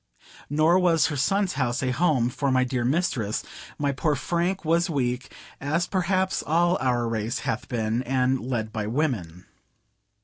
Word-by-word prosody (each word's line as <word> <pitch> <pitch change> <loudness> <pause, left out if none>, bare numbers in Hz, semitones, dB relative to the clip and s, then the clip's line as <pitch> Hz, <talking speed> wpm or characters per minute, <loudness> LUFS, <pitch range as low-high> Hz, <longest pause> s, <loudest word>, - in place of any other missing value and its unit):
Nor 155 +5 +4
was 170 -3 +3
her - - -2
son's 195 +7 +1
house 125 -2 -1
a 130 - +1
home 130 -5 +2
for 140 +2 -1
my 130 0 +3
dear 125 -1 -1
mistress; 125 - 0 0.3
my 145 -1 0
poor 145 +2 0
Frank 175 +4 -1
was 170 +3 +2
weak, 125 -3 -2 0.3
as 155 +5 0
perhaps 185 0 0
all 175 +3 +2
our 120 -2 +1
race 115 0 -2
hath 125 -3 -2
been, 115 0 -1
and 130 0 +1
led 115 -3 -3
by 110 -3 -2
women. 110 - -2
135 Hz, 160 wpm, -25 LUFS, 120-170 Hz, 0.3 s, Nor